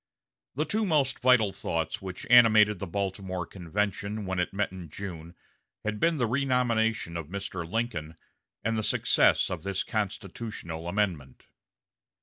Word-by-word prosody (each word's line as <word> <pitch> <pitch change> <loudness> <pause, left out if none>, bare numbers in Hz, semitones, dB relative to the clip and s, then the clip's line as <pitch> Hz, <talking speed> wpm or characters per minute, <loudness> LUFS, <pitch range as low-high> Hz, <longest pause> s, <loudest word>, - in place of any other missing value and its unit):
The 150 +4 0
two 220 +5 0
most 150 -8 +1
vital 125 -6 +4
thoughts 80 -1 -2
which 95 -1 -6
animated 110 -4 +7
the 100 - -4
Baltimore 95 -1 -3
convention 100 +4 -3
when 95 -1 -2
it 90 - 0
met 100 0 -1
in 90 -3 -9
June 85 -1 -7 0.5
had 105 0 -2
been 165 +4 +2
the 125 - +2
renomination 115 -7 +1
of 85 -3 -4
Mr. 95 -2 -5
Lincoln 90 -9 -2 0.5
and 115 -1 0
the - - +1
success - - +3
of - - -3
this 95 -1 -1
constitutional 100 -5 -4
amendment. 85 -9 -2
100 Hz, 140 wpm, -28 LUFS, 90-115 Hz, 0.5 s, animated